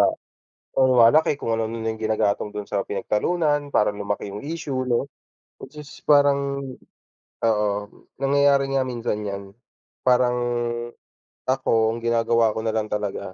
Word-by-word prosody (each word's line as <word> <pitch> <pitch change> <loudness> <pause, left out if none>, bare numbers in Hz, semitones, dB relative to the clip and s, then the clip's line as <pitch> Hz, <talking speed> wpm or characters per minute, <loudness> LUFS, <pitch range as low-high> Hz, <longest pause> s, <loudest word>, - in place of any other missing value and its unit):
ah, - - +5 0.7
lumalaki 130 +4 +5
kung 115 - -3
ano-ano 115 0 -1
yung 110 0 -3
ginagatong 110 -2 0
dun 105 - -3
sa 100 - -2
pinagtalunan 145 - 0
para 105 -6 +2
lumaki 100 0 -4
yung 105 - -6
issue, 140 -5 -3
no. 125 +3 0 0.5
Which - - -12
is 145 - -13 0.2
parang 140 -1 +3 0.8
oo, 105 -2 +2 0.5
nangyayari 140 0 +3
nga 130 -1 +1
minsan 115 -4 -3
yan. 100 0 -4 0.6
Parang, 125 -1 +4 1.1
ako 115 -4 +2
ang - - -6
ginagawa 115 -1 +2
ko 110 - -3
nalang 110 -1 -1
talaga, 105 -3 -3
115 Hz, 130 wpm, -23 LUFS, 105-140 Hz, 1.1 s, ah